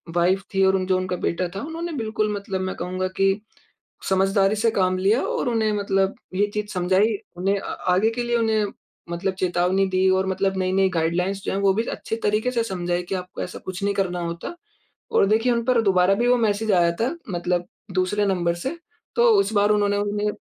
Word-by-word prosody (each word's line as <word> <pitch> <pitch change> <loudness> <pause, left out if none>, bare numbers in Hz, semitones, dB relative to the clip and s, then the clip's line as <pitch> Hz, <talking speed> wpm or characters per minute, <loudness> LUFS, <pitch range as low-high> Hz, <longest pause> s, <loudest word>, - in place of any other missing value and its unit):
Wife 185 +3 +2
थी 195 0 +3
और 190 0 +4
उन 185 -1 0
जो 185 - +2
उनका 185 0 -2
बेटा 180 +1 -1
था - - -3
उन्होंने 330 +3 -5
बिल्कुल 215 -2 -1
मतलब 200 -2 -3
मैं 185 0 -3
कहूँगा 185 +2 -3
कि 195 0 +4 0.8
समझदारी 195 +1 +3
से 230 +2 +2
काम 185 -2 +1
लिया 200 +7 +2
और 245 - -1
उन्हें 220 -2 +1
मतलब 195 -1 +1 0.2
ये 205 - +3
चीज़ 210 -1 -2
समझाई। 190 +4 +2 0.2
उन्हें 195 +2 +1
अ, - - -10 0.3
आगे 205 +5 +3
के 240 +1 -3
लिए 240 0 +1
उन्हें 220 -2 +1 0.5
मतलब 190 +3 -1
चेतावनी 180 +2 +2
दी 190 0 +2
और 190 0 +2
मतलब 190 0 0
नई-नई 190 +1 +2
गाइडलाइंस 180 +4 0
जो - - -1
हैं 195 - -1
वो 195 -1 +3
भी 225 - +1
अच्छे - - -4
तरीके 215 +4 +1
से 235 -2 0
समझाई 175 -4 -2
कि 185 +2 -4
आपको 180 0 -6
ऐसा 180 - -7
कुछ 185 +1 -5
नहीं 200 0 +1
करना 185 -3 -1
होता। 170 - -5 0.6
और - - +4
देखिए 225 +4 +2
उन 235 0 0
पर 245 -2 +3
दोबारा 190 -1 +4
भी 240 +4 +1
वो 245 0 +4
मैसेज 220 -1 +1
आया 170 -1 +4
था, 260 +8 0
मतलब 175 0 -1 0.3
दूसरे 190 +3 +1
नंबर 175 -3 +1
से। 265 - -4 0.4
तो 480 - +5
उस 395 - 0
बार 205 0 +3
उन्होंने 205 -1 +2
उन्हें 205 +1 -1
195 Hz, 210 wpm, -23 LUFS, 185-215 Hz, 0.8 s, तो